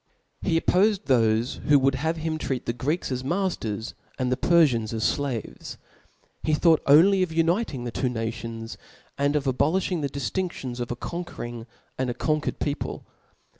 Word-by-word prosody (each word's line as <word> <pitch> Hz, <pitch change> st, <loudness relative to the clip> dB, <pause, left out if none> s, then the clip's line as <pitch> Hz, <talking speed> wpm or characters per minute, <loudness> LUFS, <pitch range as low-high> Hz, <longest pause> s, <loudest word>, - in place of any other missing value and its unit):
He 165 Hz, -3 st, +2 dB
oppofed 200 Hz, +4 st, +3 dB
thofe 115 Hz, -, +2 dB
who 145 Hz, -, +7 dB
would 135 Hz, 0 st, +3 dB
have 160 Hz, +4 st, -1 dB
had 160 Hz, -, -7 dB
him 160 Hz, -1 st, -1 dB
treat 130 Hz, -4 st, -2 dB
(0'^"? -, -, -35 dB
the 120 Hz, -, -1 dB
Greeks 145 Hz, +7 st, -2 dB
as 130 Hz, 0 st, -2 dB
matters 135 Hz, -, -2 dB
(') -, -, -33 dB
and 130 Hz, -1 st, -1 dB
the -, -, +3 dB
Perfians 130 Hz, -10 st, +3 dB
as 110 Hz, -1 st, -2 dB
totie's -, -, +4 dB
ad -, -, -2 dB, 0.4 s
flaves. -, -, -9 dB, 0.6 s
He 155 Hz, -, +1 dB
thought 160 Hz, 0 st, +4 dB
only 180 Hz, +7 st, +6 dB
of 180 Hz, -3 st, 0 dB
uniting 165 Hz, -, 0 dB
the 120 Hz, -, -4 dB
two 130 Hz, +2 st, -1 dB
nations, 115 Hz, -1 st, -5 dB, 0.4 s
tarch's^^"^^^ 140 Hz, +1 st, +2 dB
of 150 Hz, -, +1 dB
abolifhing 160 Hz, +6 st, +1 dB
the 140 Hz, -, -1 dB
diftinftions 135 Hz, -2 st, -3 dB
of 120 Hz, -, -3 dB
a 120 Hz, -, -2 dB
conquering 170 Hz, -4 st, -6 dB
Morals, 115 Hz, 0 st, -9 dB
of -, -, -31 dB
and 130 Hz, -1 st, 0 dB
a -, -, -1 dB
cotjquercd 155 Hz, -1 st, -1 dB
people. 145 Hz, -1 st, -3 dB
140 Hz, 195 wpm, -25 LUFS, 120-165 Hz, 0.6 s, who